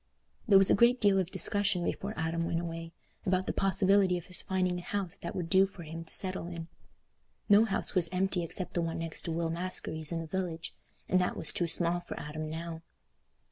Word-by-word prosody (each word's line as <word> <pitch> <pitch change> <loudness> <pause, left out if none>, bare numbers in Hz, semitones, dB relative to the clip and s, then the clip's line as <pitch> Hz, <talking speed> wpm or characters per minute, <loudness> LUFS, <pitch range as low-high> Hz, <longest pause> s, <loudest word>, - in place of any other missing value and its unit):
There 200 -3 +7
was 195 0 +5
a - - +6
great 240 +4 +4
deal 200 -2 +4
of 185 -2 -1
discussion 195 -3 +2
before 205 +3 -3
Adam 165 +1 -1
went 165 - -1
away, 165 -1 -6 0.3
about 185 0 +1
the - - -2
possibility 195 -1 +3
of 175 - -8
his 180 - +4
finding 185 -1 -1
a - - -7
house 195 -1 -4
that 170 - -6
would 175 -2 -3
do 190 +3 +4
for 190 -3 -11
him 165 +1 -7
to - - -12
settle 185 -2 0
in. 170 -1 -7 0.8
No 205 +2 +6
house 195 - 0
was 175 -4 +3
empty 185 0 0
except 175 +2 -1
the 175 - 0
one 165 -1 -2
next 165 -1 -2
to 165 - -2
Will 165 0 -1
Maskery's 165 -3 -3
in 170 - -2
the 165 - -5
village, 170 -1 -4 0.3
and 185 - +3
that 180 - -1
was 155 - -3
too 175 - 0
small 170 +1 +2
for 175 - -8
Adam 155 +1 -5
now. 165 +1 -6
175 Hz, 220 wpm, -30 LUFS, 165-190 Hz, 0.8 s, There